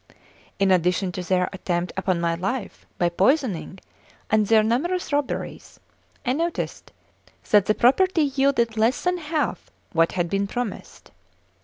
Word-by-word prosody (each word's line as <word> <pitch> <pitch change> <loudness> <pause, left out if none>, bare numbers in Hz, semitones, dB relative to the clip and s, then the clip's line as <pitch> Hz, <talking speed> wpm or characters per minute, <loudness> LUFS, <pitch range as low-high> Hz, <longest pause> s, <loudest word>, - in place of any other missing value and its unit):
In 195 -1 +2
addition 180 +1 +2
to 180 - -5
their 180 0 +1
attempt 175 -2 -2
upon 190 -2 0
my 170 0 0
life 195 +7 -4
by 175 - +2
poisoning 195 - 0 0.5
and 215 -1 +3
their 220 0 +5
numerous 305 +10 -1
robberies, 290 -2 -3 0.5
I 250 - +2
noticed 335 +4 -3 0.6
that 205 -2 +5
the 215 - +3
property 325 +7 +3
yielded 270 -5 +1
less 225 +5 +2
than 360 0 0
half 310 -1 -2 0.2
what 165 0 +2
had 175 -2 0
been 200 +3 -1
promised. 240 +1 -6
215 Hz, 140 wpm, -24 LUFS, 185-275 Hz, 0.6 s, their